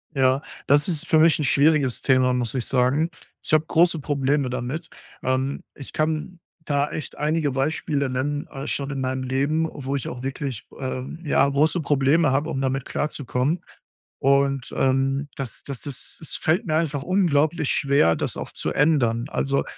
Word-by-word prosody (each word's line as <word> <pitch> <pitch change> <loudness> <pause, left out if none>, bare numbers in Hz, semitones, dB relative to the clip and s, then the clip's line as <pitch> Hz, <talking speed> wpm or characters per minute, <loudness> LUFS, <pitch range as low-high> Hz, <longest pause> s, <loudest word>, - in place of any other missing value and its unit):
Ja, 130 +1 +3 0.3
das 145 +3 +4
ist 170 0 -2
für 160 -5 +4
mich 160 0 +6
'n - - 0
schwieriges 140 -2 +3
Thema, 130 -1 +3
muss 125 -1 -1
ich 125 - -1
sagen. 135 +6 +2 0.3
Ich - - -4
habe 155 0 +4
große 170 0 +3
Probleme 140 -1 0
damit. 130 +6 -4 0.3
Ähm, 130 +2 0
ich 140 - -9
kann 155 +3 -1 0.3
da 145 0 +1
echt 155 - -6
einige 150 0 0
Beispiele 140 0 0
nennen, 145 +3 -2
äh, 135 +1 -7
schon 140 0 -2
in 140 -1 -3
meinem 130 0 -2
Leben, 140 +5 0
wo 135 -1 -4
ich 140 - -3
auch 125 0 -6
wirklich, 135 -3 -4
ähm, 130 +4 -4
ja, 145 -2 +3
große 150 +5 +2
Probleme 145 +1 +3
habe, 145 +4 0
um 145 -5 -2
damit 135 0 -1
klarzukommen. 145 +1 -1 0.6
Und, 140 -1 +2
ähm, 135 +2 +1
das 130 -6 -6
das 140 -4 -6
das 140 -3 -6
es 160 - -4
fällt 160 +3 +1
mir 155 - +1
einfach 150 -4 0
unglaublich 160 -4 +2
schwer, 140 - +3
das - - -3
auch - - -6
zu - - -3
ändern. 125 -6 +2
Also, 140 0 0
140 Hz, 175 wpm, -24 LUFS, 130-155 Hz, 0.6 s, mich